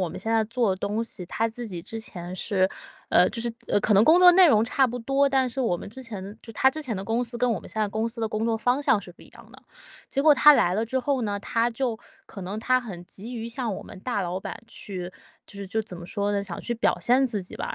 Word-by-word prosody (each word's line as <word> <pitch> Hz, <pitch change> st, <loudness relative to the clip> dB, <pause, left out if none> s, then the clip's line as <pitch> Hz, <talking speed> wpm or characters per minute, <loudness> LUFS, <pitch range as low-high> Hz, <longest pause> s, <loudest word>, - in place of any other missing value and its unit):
我 185 Hz, -, +1 dB
们 -, -, -7 dB
现 225 Hz, -, -3 dB
在 225 Hz, -1 st, +3 dB
做 230 Hz, 0 st, 0 dB
的 185 Hz, -, 0 dB
东 205 Hz, +4 st, -2 dB
西， 190 Hz, -5 st, -6 dB
他 225 Hz, +5 st, -1 dB
自 235 Hz, +2 st, -6 dB
己 180 Hz, -5 st, -6 dB
之 225 Hz, +6 st, -7 dB
前 180 Hz, -4 st, -7 dB
是， 190 Hz, -1 st, +1 dB, 0.4 s
呃， 180 Hz, -, +5 dB
就 230 Hz, -, -3 dB
是 235 Hz, -, -1 dB, 0.2 s
呃， 205 Hz, -, +2 dB
可 210 Hz, -, +2 dB
能 200 Hz, +3 st, +6 dB
工 330 Hz, +3 st, +6 dB
作 360 Hz, -, +10 dB
内 365 Hz, 0 st, +7 dB
容 220 Hz, -9 st, +5 dB
差 260 Hz, +3 st, +2 dB
不 245 Hz, +1 st, -5 dB
多， 275 Hz, +4 st, +2 dB
但 265 Hz, -2 st, +2 dB
是 255 Hz, +2 st, -4 dB
我 205 Hz, -8 st, +1 dB
们 -, -, -8 dB
之 260 Hz, +5 st, -9 dB
前 205 Hz, -3 st, -7 dB
就 225 Hz, -, -10 dB
他 265 Hz, +5 st, +4 dB
之 310 Hz, +3 st, -5 dB
前 250 Hz, -6 st, -3 dB
的 190 Hz, -, -4 dB
公 225 Hz, +4 st, -1 dB
司， 235 Hz, 0 st, -6 dB
跟 250 Hz, 0 st, +2 dB
我 225 Hz, -, 0 dB
们 -, -, -12 dB
现 220 Hz, -, -3 dB
在 210 Hz, -, +1 dB
公 220 Hz, +2 st, -1 dB
司 230 Hz, 0 st, -6 dB
的 225 Hz, -, 0 dB
工 215 Hz, +1 st, -2 dB
作 230 Hz, 0 st, +1 dB
方 245 Hz, +5 st, +1 dB
向 225 Hz, -7 st, +3 dB
是 180 Hz, -, -11 dB
不 175 Hz, -, -18 dB
一 -, -, -17 dB
样 -, -, -17 dB
的。 -, -, -16 dB, 0.5 s
结 275 Hz, -, 0 dB
果 300 Hz, 0 st, +7 dB
他 295 Hz, +2 st, +8 dB
来 180 Hz, -10 st, +3 dB
了 220 Hz, +3 st, 0 dB
之 255 Hz, +3 st, -1 dB
后 265 Hz, 0 st, 0 dB
呢， 205 Hz, -2 st, -2 dB
他 230 Hz, +3 st, 0 dB
就 240 Hz, -2 st, -2 dB, 0.3 s
可 195 Hz, -, -9 dB
能 195 Hz, +4 st, -5 dB
他 255 Hz, +2 st, +3 dB
很 195 Hz, -8 st, -8 dB
急 225 Hz, +8 st, -8 dB
于 230 Hz, -1 st, -5 dB
向 235 Hz, -3 st, -3 dB
我 -, -, -7 dB
们 -, -, -12 dB
大 240 Hz, -1 st, -2 dB
老 180 Hz, +1 st, -3 dB
板 -, -, -7 dB
去， 185 Hz, -5 st, -7 dB, 0.4 s
就 -, -, -12 dB
是 200 Hz, 0 st, -6 dB
就 220 Hz, +4 st, -1 dB
怎 190 Hz, -4 st, -8 dB
么 175 Hz, -, -9 dB
说 205 Hz, +1 st, -1 dB
呢， 200 Hz, -1 st, 0 dB
想 190 Hz, -4 st, -6 dB
去 240 Hz, -, -2 dB
表 230 Hz, -, +1 dB
现 255 Hz, +3 st, +3 dB
自 215 Hz, -6 st, -3 dB
己 180 Hz, -, -7 dB
吧。 -, -, -4 dB
225 Hz, 320 characters per minute, -25 LUFS, 200-245 Hz, 0.5 s, 作